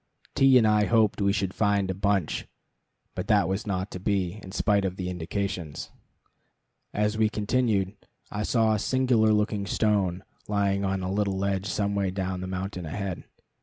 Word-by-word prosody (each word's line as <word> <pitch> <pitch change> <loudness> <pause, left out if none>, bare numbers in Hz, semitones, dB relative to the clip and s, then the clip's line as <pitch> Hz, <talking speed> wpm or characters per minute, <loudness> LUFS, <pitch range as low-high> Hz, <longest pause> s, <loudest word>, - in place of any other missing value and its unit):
T 135 -1 +6
and 115 - +4
I 105 -1 +4
hoped 110 -2 +2
we 100 0 +3
should 95 -2 -1
find 100 -3 +1
a - - -2
bunch, 100 -3 0 0.7
but - - -4
that - - +4
was 95 +4 -2
not 95 0 -2
to 90 - -6
be, 95 0 -1
in 95 - -10
spite 100 0 +2
of 95 -1 -2
the 90 -1 -4
indications. 90 -2 -4 1.0
As 105 +1 0
we 110 -1 +4
continued, 105 -3 0 0.4
I 105 - -3
saw 110 0 +2
a 105 - 0
singular 125 -3 +2
looking 105 -1 0
stone 100 -4 +1 0.2
lying 100 -1 +1
on 95 -1 -1
a 95 - -2
little 100 -1 0
ledge 95 0 -1
some 100 0 -1
way 100 -1 0
down 95 -1 -3
the 95 - -4
mountain 95 -2 -4
ahead. 95 +2 -4
100 Hz, 175 wpm, -27 LUFS, 95-105 Hz, 1.0 s, T